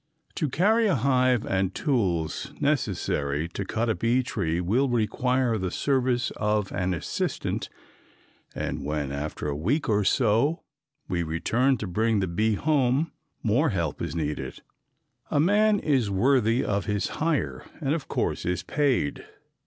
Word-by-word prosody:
To 155 - -1
carry 215 - +3
a 190 - +3
hive 125 -2 +2
and 95 0 0
tools 95 - -1
necessary 70 +2 0
to 100 - -4
cut 115 +4 -1
a 110 - +2
bee 120 +4 +1
tree 85 -9 -1
will 115 +10 +1
require 120 +1 +1
the 95 -1 -1
service 130 +2 0
of 105 -1 0
an 90 -1 -1
assistant 85 - -3 0.9
and - - -3
when, 75 -1 -2
after 75 +2 -4
a 70 - -2
week 120 - 0
or 105 -2 +2
so, 115 - +2 0.4
we 90 -3 -1
return 110 +12 +1
to 105 - -4
bring 110 +4 +1
the 95 - +1
bee 105 +5 +1
home, 145 +2 +1 0.3
more 125 +8 +3
help 85 - -2
is - - -3
needed. 75 -5 -4 0.7
A - - +1
man 205 +6 +4
is 135 - +1
worthy 115 +3 +2
of 100 -2 -1
his 105 -1 -1
hire 160 -2 0 0.2
and 145 -3 0
of 160 -3 -3
course - - -1
is 90 0 -1
paid. 135 - 0
110 Hz, 150 wpm, -26 LUFS, 90-135 Hz, 0.9 s, man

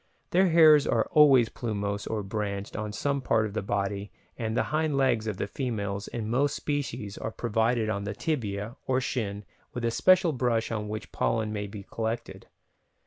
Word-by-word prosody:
Their 185 +2 +4
hairs 155 -3 +7
are - - +2
always 135 -6 +6
plumose 100 -3 -3
or 110 -2 -2
branched 100 -1 -4
on 105 0 -3
some 140 +6 -1
part 110 -3 +2
of 105 - -5
the - - -1
body 100 0 -2 0.2
and 110 0 -3
the - - +3
hind 155 -2 +1
legs 120 -5 +2
of 105 -4 -2
the - - -1
females 100 -4 -3
in 110 -3 -4
most 135 +5 +1
species 130 -8 -3
are - - -3
provided 115 0 0
on 100 -2 -2
the 100 0 -4
tibia 115 - -3
or 130 0 +2
shin 105 -6 -3 0.3
with 120 -1 -2
a 115 - +1
special 185 - +4
brush 120 -3 0
on 105 -2 -2
which 110 0 -6
pollen 110 -2 0
may 105 -1 -3
be 100 0 -8
collected. 115 +3 -4
110 Hz, 185 wpm, -28 LUFS, 105-130 Hz, 0.3 s, hairs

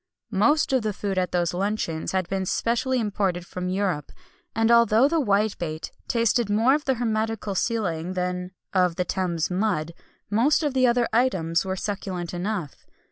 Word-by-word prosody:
Most 270 +9 +3
of 260 - +3
the 215 -1 -2
food 195 -1 -2
at 180 -1 -1
those 175 -1 0
luncheons 185 -4 -2
had 185 -2 0
been 190 0 -2
specially 245 +5 0
imported 195 -5 -1
from 180 -1 -4
Europe; 185 -6 -1 0.4
and 225 +1 +3
although 235 +1 +5
the 325 +1 +1
whitebait 200 - -1 0.2
tasted 230 -1 +1
more 225 +6 +4
of 300 +1 0
the 265 - +2
hermetical 220 -3 -1
sealing 185 -6 -1
than 180 0 -2 0.2
of 180 -3 +2
the 180 - -1
Thames 175 -3 -1
mud, 180 -5 0 0.4
most 250 +10 +2
of 295 -3 0
the 255 -1 +4
other 240 -1 +2
items 190 -9 +1
were 190 0 -2
succulent 190 -3 -4
enough. 180 -4 -4
200 Hz, 165 wpm, -25 LUFS, 180-230 Hz, 0.4 s, although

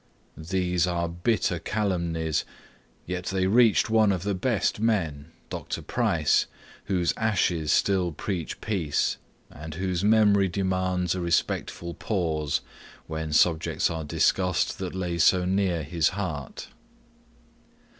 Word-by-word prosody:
These 90 +1 0
are 85 -1 -1
bitter 85 +1 0
calumnies, 85 -5 -1 0.6
yet 90 0 -4
they 95 -1 0
reached 115 +3 +4
one 110 -2 +4
of 90 -3 -2
the 100 0 -1
best 105 +1 0
of - - -3
men, 80 -10 0 0.2
(Dr. - - -5
Price.) - - +1 0.4
whose 90 -4 +1
ashes 90 -8 +1
still 95 -3 +2
preach 85 +1 -4
peace, 90 -9 0 0.3
and 80 +1 -8
whose 90 0 -2
memory 105 -2 +4
demands 95 -1 0
a 95 - -3
respectful 85 0 -1
pause, 80 -9 -1 0.4
when 80 -1 -4
subjects 80 +1 +2
are 80 -1 -4
discussed 90 +5 +1
that 95 -1 -4
lay 90 -2 -2
so 90 +2 +4
near 95 -3 0
his 80 +1 +1
heart. 90 -8 -5
90 Hz, 125 wpm, -26 LUFS, 80-95 Hz, 0.6 s, reached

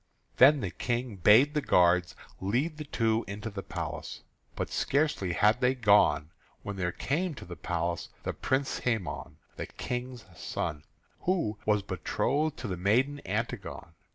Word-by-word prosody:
Then 140 +2 +7
the 95 - -2
King 120 -3 -2
bade 110 - +6
the 150 - +1
guards 90 -5 +3 0.2
lead 130 - 0
the 150 - -6
two 115 -4 +1
into 105 +3 -5
the 100 -1 -5
palace. - - -6 0.3
But - - -3
scarcely 140 - +1
had 105 +7 +3
they 125 +1 +3
gone 100 - +4 0.3
when 100 - -4
there 90 -2 -1
came 160 - -1
to - - -9
the 90 - -8
place 85 0 -2
the - - -2
Prince 135 +1 -1
Hæmon, 115 -7 -2 0.2
the - - -4
King's 125 -1 -5
son, 75 -1 -4 0.3
who 165 - 0
was 105 -2 +3
betrothed 135 - -1
to 115 - -5
the 90 -3 -3
maiden 125 +10 +2
Antigone. 100 -6 -4
110 Hz, 155 wpm, -29 LUFS, 95-130 Hz, 0.3 s, Then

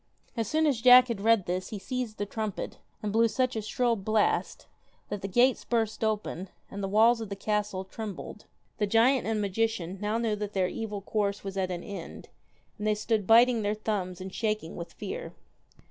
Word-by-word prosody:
As 225 -3 -1
soon 315 +5 +2
as 270 -7 +1
Jack 250 0 +8
had 220 -4 -3
read 225 -3 +4
this 185 +1 -2
he 215 - -5
seized 230 +2 -4
the 205 - -2
trumpet, 215 -1 -4 0.2
and 205 -1 -2
blew 230 +1 +5
such 255 +2 0
a 220 - -1
shrill 235 +2 +1
blast, 215 +1 0 0.4
that 205 -2 -4
the 195 - -3
gates 240 +6 +3
burst 225 -2 -1
open, 210 -4 -2 0.2
and 200 - -5
the 195 - -1
walls 225 +4 +4
of 220 - -5
the 200 - -4
castle 205 -2 -2
trembled. 210 0 -7 0.3
The 210 - +2
giant 230 +5 +3
and 220 -1 0
magician 200 -3 -1
now 210 +2 0
knew 230 -2 0
that 210 0 -4
their 185 -2 +2
evil 210 0 -4
course 205 0 -1
was 195 -1 -5
at 190 -1 -1
an 175 -1 -4
end, 200 - -8 0.5
and 210 - -2
they 215 - +3
stood 215 -1 -1
biting 235 +1 +6
their 205 0 0
thumbs 195 -4 -3
and 185 0 -7
shaking 215 -7 -2
with 170 - -7
fear. - - -6
215 Hz, 200 wpm, -28 LUFS, 195-230 Hz, 0.5 s, Jack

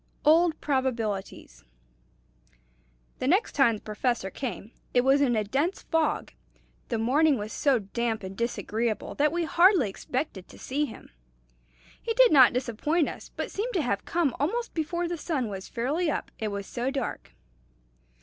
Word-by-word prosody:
"OLD 320 +1 +4
PROBABILITIES." 225 - -2 1.6
The 255 - -1
next 380 - +3
time 235 -5 +3
the 210 - -11
Professor 215 -2 -1
came, 225 -4 -5 0.2
it 245 - +6
was 270 +2 +4
in 250 -4 +3
a 215 - +1
dense 280 - -1
fog. 325 -2 0 0.6
The 230 - 0
morning 275 +6 +3
was 210 0 -5
so 275 -3 +3
damp 225 +1 -2
and 190 +1 -7
disagreeable 230 0 -2
that 295 +1 +2
we 345 +1 -1
hardly 340 - +4
expected 245 - -4
to - - -14
see 290 +3 -1
him. 255 - -11 0.9
He 455 - -2
did - - +6
not 265 -4 +8
disappoint 260 +6 0
us, - - -9
but - - -4
seemed 455 +4 -3
to 340 - +2
have 200 -6 -1
come 325 -7 0
almost 460 - -1
before 340 +2 -2
the 345 0 -3
sun 280 -9 -2
was 190 -2 -7
fairly 295 +9 -1
up, - - -3
it 220 - -2
was 200 -1 -4
so 245 +4 -3
dark. 270 -2 -4
260 Hz, 160 wpm, -27 LUFS, 225-320 Hz, 1.6 s, not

